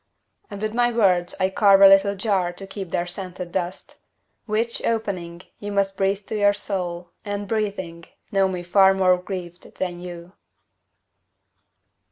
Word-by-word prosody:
And 200 0 -7
with 215 0 -2
my 240 0 +2
words 185 -6 +2
I 190 0 +1
carve 200 -1 +5
a 195 - +10
little 195 +1 +5
jar 190 -3 0
To 195 +2 -6
keep 195 -2 -7
their 175 - -1
scented 180 -1 -4
dust, 180 0 -4 0.5
Which, 225 +2 0
opening, 185 -6 -3 0.2
you 205 0 -5
must 195 -1 0
Breathe 195 +1 -1
to 220 - -5
your 205 0 +4
soul, 180 -4 -4
and, 205 0 -4
breathing, 195 -6 -3 0.3
know 195 -1 +3
me 180 -2 -4
far 190 +2 +5
More 185 -1 +4
grieved 180 -2 -8
than 175 -2 -3
you. 175 0 -9
195 Hz, 155 wpm, -23 LUFS, 180-205 Hz, 0.5 s, a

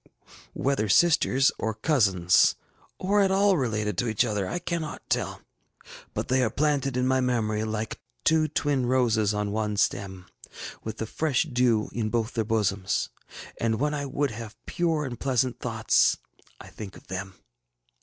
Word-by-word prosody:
Whether 130 -6 0
sisters, 135 - +4
or 110 -1 -2
cousins, 100 - +3 0.4
or 205 +2 +2
at 195 - +3
all 195 +1 +4
related 105 - -1
to 125 - 0
each 110 -2 +2
other, 105 -3 -1
I - - -2
cannot 170 -3 -4
tell; - - -1 0.7
but - - -2
they 130 +1 +2
are 120 - +2
planted 140 -1 0
in 125 - +1
my 130 0 +2
memory 110 -4 0
like 110 0 -3 0.3
ŌĆśtwo 155 -1 +3
twin 140 -3 +1
roses 115 -5 +2
on 105 -1 -2
one 105 -1 -1
stem, 95 -2 -1 0.2
ŌĆÖ - - -10
with 110 0 -5
the 110 - -3
fresh 140 +3 0
dew 125 -7 +1
in 110 -2 -1
both 115 +1 -1
their 115 - 0
bosoms; 105 -3 0 0.5
and 115 -1 0
when 150 +2 +1
I 145 -1 -3
would 140 +1 -1
have 110 0 -8
pure 165 -3 0
and 120 -4 -6
pleasant 130 -2 0
thoughts, 110 -3 +2 0.4
I - - -11
think 100 -3 -9
of - - -17
them. 95 +1 -6
120 Hz, 165 wpm, -26 LUFS, 105-140 Hz, 0.7 s, sisters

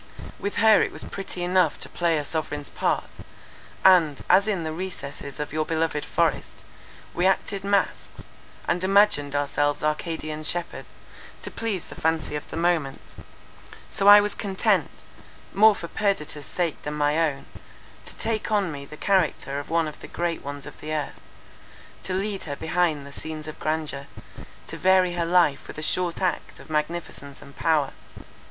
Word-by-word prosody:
With 200 - -3
her 220 -1 +6
it - - 0
was - - -4
pretty 190 -2 -5
enough 180 -3 +2
to - - -3
play 170 -2 0
a 150 - -2
sovereign's 145 -2 -4
part; - - 0 0.8
and, 170 -7 +5
as 200 +3 +5
in 195 -6 0
the 160 0 -3
recesses 150 -5 -7
of 150 -1 -4
your 155 0 +1
beloved 160 -2 -1
forest - - -1 0.5
we 180 +2 +2
acted 195 +1 0
masques, 200 0 -1 0.4
and 175 +1 +1
imagined 190 -8 +3
ourselves 145 +1 0
Arcadian 155 0 -2
shepherds, 170 +3 -3 0.6
to - - -5
please 215 -6 -3
the - - -11
fancy 160 -2 0
of 150 - -6
the - - -5
moment—so 170 +3 -4
was 205 0 0
I - - -16
content, 195 -3 +1 0.6
more 215 +2 +6
for 170 - -6
Perdita's 165 -8 -2
sake 170 -4 -2
than 150 0 -4
my 150 +1 +2
own, 150 -4 0 0.6
to - - -9
take 220 -1 -2
on 200 -5 +2
me 140 -1 -7
the 150 +2 -11
character 165 -8 +1
of 145 - -8
one 165 -1 +2
of 150 - -8
the - - -9
great 170 -1 -2
ones 145 0 -6
of - - -11
the 155 - -5
earth; 150 -2 -3 0.8
to 185 - -3
lead 195 0 -2
her 145 -2 -4
behind 160 -2 0
the 140 - -11
scenes 155 0 -7
of 155 - -8
grandeur, 155 -3 -2 0.6
to - - -7
vary 185 -1 +4
her 170 -1 -1
life 170 -5 +3
with - - -9
a 155 - -4
short 180 +2 0
act 180 - -2
of - - -13
magnificence 150 -3 -3
and 140 -1 -15
power. 155 -4 +1
165 Hz, 170 wpm, -25 LUFS, 150-185 Hz, 0.8 s, her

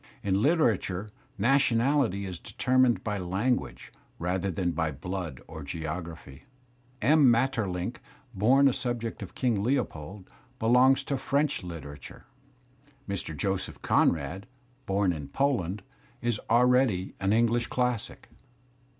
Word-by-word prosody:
In 100 - 0
literatiu^ 110 - +1 0.3
nationality 120 -1 +2
j - - -4
is 90 -2 -7
determined 130 -2 +2
by 105 -2 -2
language 95 +8 -2 0.2
rather 90 +3 -1
than 90 0 -1
by 80 -1 -1
blood 80 -1 -5
or 80 -1 -8
geography. 80 -1 -6 0.3
/ 125 0 -34
M. 145 +1 +6
Maeterlinck, 115 -5 0 0.4
bom 125 +8 +4
a 135 - +3
subject 120 -3 -3
of 100 - -8
King 120 -6 +1
Leopold, 100 - -2 0.3
belongs 130 +4 +4
to 140 0 -2
French 145 +2 0
literature. 75 -6 -9 0.8
Mr. 90 -6 -4
Joseph 95 +6 -2
Conrad, 85 - +1 0.4
bom 95 -2 +2
in 75 -4 -6
Poland,. 105 - -1 0.4
is 120 -3 -1
already 120 -5 +3
an 95 +1 +1
English 115 +1 +2
classic. 125 -3 -2
105 Hz, 120 wpm, -28 LUFS, 90-125 Hz, 0.8 s, M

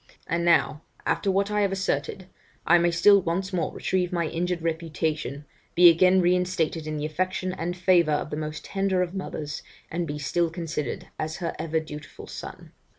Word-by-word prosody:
And 170 -1 -1
now, 170 -3 +3 0.2
after 200 - 0
what 200 +2 +1
I 210 0 +1
have 200 -1 +2
asserted, 185 -1 -2 0.4
I 175 +1 +6
may 175 0 +3
still 195 +4 +5
once 185 +3 -2
more 175 -3 0
retrieve 180 -2 -1
my 170 -2 0
injured 170 0 -2
reputation, 160 -3 -2 0.3
be 175 0 +9
again 185 +3 +4
reinstated 175 -3 +1
in 155 0 -3
the 150 - -2
affection 185 +3 -2
and 175 0 -4
favour 175 -3 +4
of 150 - -2
the - - -2
most 155 0 -5
tender 195 -2 +1
of 180 0 -5
mothers, 155 -6 -5 0.3
and 170 0 -2
be 145 0 -4
still 170 +4 0
considered 160 -5 -4
as 155 +1 -3
her 170 -3 -3
ever 160 0 0
dutiful 150 -1 -9
son. - - -9
170 Hz, 180 wpm, -26 LUFS, 155-185 Hz, 0.4 s, be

